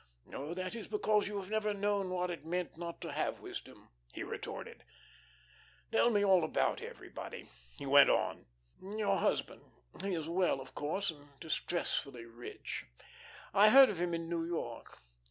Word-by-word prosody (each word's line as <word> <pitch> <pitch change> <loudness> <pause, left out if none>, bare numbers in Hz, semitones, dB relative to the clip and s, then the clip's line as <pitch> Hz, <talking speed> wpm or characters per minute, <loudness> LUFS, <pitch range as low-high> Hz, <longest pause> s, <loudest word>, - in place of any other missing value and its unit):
"Oh, 150 +5 -4
that 185 0 -3
is 230 - -6
because 215 - +2
you 205 0 -3
have 195 0 -6
never 215 -1 +1
known 200 -1 0
what 180 0 -1
it 170 - -6
meant 175 +2 -2
not 170 0 -6
to - - -5
have - - -1
wisdom," - - -9 0.2
he - - -5
retorted. - - -6 1.1
"Tell 235 - +5
me 205 -3 +3
about 190 -4 +3
everybody," - - -8 0.3
he - - -6
went 140 +1 +8
on. - - +1 0.3
"Your 205 +2 0
husband, - - 0 0.4
he 195 -1 -1
is 160 -2 -3
well, 175 -4 +2
of 130 -1 -10
course, 165 +6 -1
and 145 -2 -17
distressfully 145 -6 -2
rich. 115 +1 -7 0.7
I 205 +2 +8
heard 265 +1 +9
of 175 -4 -4
him 175 -1 0
in 165 0 -4
New 170 -1 -1
York. 165 - -5
180 Hz, 160 wpm, -34 LUFS, 160-205 Hz, 1.1 s, heard